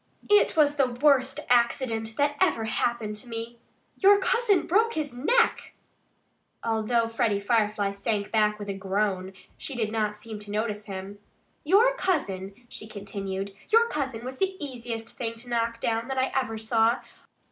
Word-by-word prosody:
"It 415 -5 +5
was 295 -1 +4
the 270 -2 +4
worst 265 +1 +2
accident 235 -2 +1
that 290 0 +2
ever 325 -12 +3
happened 220 -1 -1
to 230 - -9
me.... 230 0 -6 0.4
Your 400 +1 +7
cousin 425 -1 +2
broke 450 +6 +2
his 295 -4 -2
neck!" 455 - +1 0.9
Although 230 +1 +1
Freddie 225 -3 0
Firefly 210 -1 +1
sank 200 +1 -2
back 210 -1 +2
with 205 -1 -7
a 200 - -2
groan, 195 -1 -1 0.3
she 275 - -5
did 220 -3 -1
not 215 -2 -1
seem 215 0 -8
to 205 0 -12
notice 210 0 -2
him. 195 0 -7 0.4
"Your 420 +10 +5
cousin 205 - -2
" 245 - -28
she 215 - -8
continued 195 -1 -5 0.2
"your 460 +2 +5
cousin 260 -6 -3
was 260 +1 -6
the 385 0 -1
easiest 235 -5 -5
thing 230 -2 -2
to 240 +2 -8
knock 230 -1 -1
down 230 +1 -1
that 270 0 -3
I 260 0 +1
ever 255 -4 0
saw. 225 +1 +2
230 Hz, 165 wpm, -27 LUFS, 210-270 Hz, 0.9 s, Your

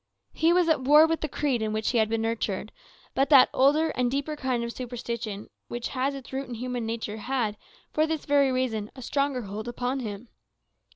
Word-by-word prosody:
He 325 +1 +3
was 355 -1 +4
at 315 -4 +3
war 295 +4 +7
with 325 0 -1
the 310 - -1
creed 270 -5 0
in 215 -1 -1
which 215 0 0
he 240 - +2
had 220 -1 +2
been 225 0 0
nurtured; 220 -2 -2 0.4
but 270 +1 +1
that 275 -4 +7
older 295 +5 +4
and 250 -1 0
deeper 280 +4 -2
kind 260 -4 -1
of 235 0 -4
superstition 235 -4 -5 0.2
which 240 0 -4
has 270 +1 -1
its 270 -1 -10
root 270 +1 -3
in 240 - -6
human 245 -1 -3
nature 225 -2 -4
had, 225 -2 -1 0.4
for 310 +1 +2
this 315 -2 -3
very 285 -2 +3
reason, 230 -5 -1
a 260 - -9
stronger 275 -1 0
hold 210 +3 -6
upon 250 +2 -2
him. 220 -1 -6
250 Hz, 210 wpm, -27 LUFS, 225-280 Hz, 0.4 s, war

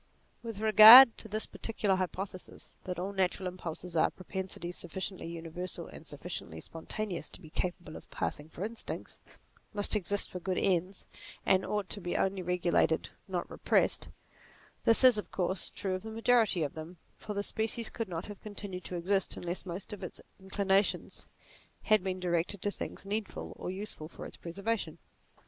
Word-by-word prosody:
With 225 -3 -6
regard 220 +3 +11
to - - -7
this 215 +1 -1
particular 210 -3 -1
hypothesis, 185 0 -5
that 180 -2 -3
all 190 +3 -3
natural 190 -1 0
impulses, 175 -1 -6
all 160 - +4
propensities 185 -2 -6
sufficiently 185 +1 -4
universal 170 +2 -5
and - - -12
sufficiently 80 - -5
spontaneous 170 - -5
to - - -10
be 155 - -13
capable 175 -3 -3
of - - -11
passing 150 +2 -3
for 180 +4 -5
instincts, 230 +1 -6 0.6
must 205 +1 +3
exist 205 0 -1
for 180 - -5
good 185 +1 -2
ends, 185 0 0 0.4
and 190 0 +4
ought 210 -2 -2
to 205 - -3
be 175 - -2
only 190 0 0
regulated, 175 -2 +1 0.2
not 180 -2 -2
repressed; - - +1 0.8
this 230 +3 +4
is 250 -4 +8
of - - -6
course 185 -1 -1
true 190 -2 -3
of 185 - -2
the 220 - -7
majority 225 -5 +3
of 145 - -3
them, 160 +3 -8 0.2
for 210 - -6
the 200 - 0
species 220 +2 -1
could 230 -4 -4
not 170 -1 -4
have 205 -2 -9
continued 200 -3 -6
to 180 - -5
exist 190 +3 0
unless 175 +2 -4
most 180 +4 -5
of 205 - -8
its 180 - -7 0.2
inclinations 195 +1 0 0.6
had 215 -3 +4
been 185 -1 -2
directed 175 +2 0
to 205 - +1
things - - -6
needful 210 +1 -3
or - - -5
useful 190 -5 -5
for - - -9
its - - -8
preservation. 200 +6 -3
190 Hz, 170 wpm, -31 LUFS, 175-205 Hz, 0.8 s, regard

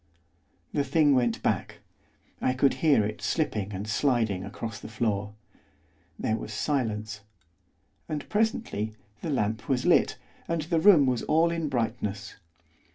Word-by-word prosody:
The 145 - +1
thing 145 +1 +3
went 120 -3 +1
back, - - -1 0.6
I 130 - +2
could 135 +2 +3
hear 145 -10 +4
it 105 0 -5
slipping 105 - -1
and 100 +2 -5
sliding 110 -5 +1
across 110 +3 -6
the - - -9
floor. 105 -2 -2 0.8
There 110 - 0
was 110 - -7
silence. 110 -4 -2 0.9
And, 150 -2 -4
presently, 210 - -1 0.3
the - - -4
lamp 110 -4 -1
was 130 -2 +1
lit, - - +4 0.3
and 165 -2 -1
the 165 +1 +1
room 170 -6 +7
was 125 -2 +1
all 165 +2 +3
in 165 -3 -2
brightness. 110 -4 -3
120 Hz, 140 wpm, -27 LUFS, 105-150 Hz, 0.9 s, room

